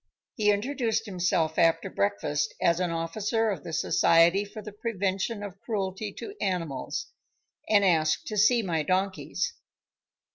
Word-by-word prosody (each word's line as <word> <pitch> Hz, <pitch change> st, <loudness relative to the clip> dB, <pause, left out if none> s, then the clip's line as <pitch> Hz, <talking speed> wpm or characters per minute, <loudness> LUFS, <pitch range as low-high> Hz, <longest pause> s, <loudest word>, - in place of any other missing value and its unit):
He 210 Hz, -2 st, +1 dB
introduced 225 Hz, +1 st, 0 dB
himself 180 Hz, -5 st, 0 dB
after 165 Hz, 0 st, +3 dB
breakfast 105 Hz, +9 st, -1 dB
as 170 Hz, 0 st, +2 dB
an 180 Hz, -1 st, 0 dB
officer 210 Hz, +7 st, -1 dB
of 195 Hz, -, -5 dB
the -, -, -7 dB
Society 170 Hz, +3 st, +4 dB
for 205 Hz, +1 st, -9 dB
the 210 Hz, 0 st, -8 dB
Prevention 205 Hz, 0 st, -2 dB
of 195 Hz, -1 st, -8 dB
Cruelty 200 Hz, -2 st, -3 dB
to 405 Hz, -, -8 dB
Animals, 165 Hz, -8 st, -2 dB, 0.6 s
and 205 Hz, -2 st, +5 dB
asked 160 Hz, -4 st, +2 dB
to 215 Hz, -, -5 dB
see 230 Hz, +3 st, +4 dB
my 165 Hz, -5 st, 0 dB
donkeys. 190 Hz, -, -1 dB
190 Hz, 140 wpm, -27 LUFS, 165-210 Hz, 0.6 s, and